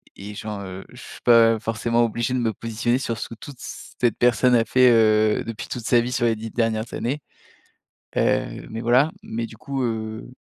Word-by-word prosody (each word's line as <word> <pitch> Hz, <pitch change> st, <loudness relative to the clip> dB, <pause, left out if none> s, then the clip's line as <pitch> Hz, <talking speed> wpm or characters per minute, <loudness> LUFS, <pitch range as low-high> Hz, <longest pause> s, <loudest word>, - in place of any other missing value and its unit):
et 105 Hz, +1 st, -9 dB
genre, 105 Hz, -1 st, -5 dB
heu, 95 Hz, 0 st, -8 dB
je -, -, -13 dB
suis -, -, -11 dB
pas 115 Hz, -2 st, +6 dB
forcément 115 Hz, +2 st, 0 dB
obligé 120 Hz, +2 st, -1 dB
de -, -, +1 dB
me 115 Hz, -2 st, 0 dB
positionner 115 Hz, +4 st, -1 dB
sur 115 Hz, -4 st, -3 dB
ce -, -, -5 dB
que -, -, -8 dB
toute 135 Hz, +3 st, -11 dB
cette 120 Hz, -2 st, -3 dB
personne 125 Hz, +1 st, +4 dB
a 115 Hz, -, +4 dB
fait, 130 Hz, 0 st, +5 dB
heu, 110 Hz, -2 st, +4 dB
depuis 115 Hz, +1 st, -6 dB
toute 120 Hz, -3 st, -5 dB
sa 120 Hz, -, +4 dB
vie 125 Hz, +1 st, -3 dB
sur 120 Hz, -1 st, 0 dB
les 115 Hz, -1 st, +2 dB
10 110 Hz, +1 st, -7 dB
dernières 115 Hz, -1 st, -1 dB
années. 135 Hz, +5 st, -2 dB, 1.0 s
Heu, -, -, 0 dB
mais 115 Hz, +1 st, -5 dB
voilà. 125 Hz, +6 st, +4 dB
Mais 115 Hz, +1 st, -4 dB
du 110 Hz, -, -11 dB
coup, 135 Hz, +2 st, -4 dB
heu 110 Hz, -1 st, -4 dB
115 Hz, 205 wpm, -23 LUFS, 110-120 Hz, 1.0 s, pas